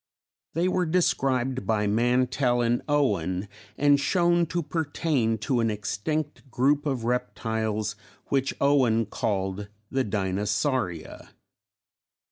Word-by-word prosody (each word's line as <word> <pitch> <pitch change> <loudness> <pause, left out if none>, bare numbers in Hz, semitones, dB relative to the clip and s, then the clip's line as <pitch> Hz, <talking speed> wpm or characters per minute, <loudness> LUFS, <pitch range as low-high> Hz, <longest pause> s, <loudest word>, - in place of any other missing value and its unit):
They 170 +2 +2
were 185 -1 +1
described 130 - +1
by 110 -2 +1
Mantell 120 +3 +2
and 120 0 +1
Owen 100 - +1 0.3
and 145 0 +4
shown 175 +2 +2
to 170 +1 -2
pertain 145 -6 0
to 130 -3 +1
an 115 -1 +2
extinct 135 +8 -3
group 140 +4 +2
of 130 -5 -1
reptiles 110 -3 -1 0.3
which 135 -1 0
Owen 130 -5 +3
called 95 -1 -2 0.2
the 135 0 +1
Dinosauria. 100 - -2
125 Hz, 105 wpm, -26 LUFS, 105-145 Hz, 0.3 s, and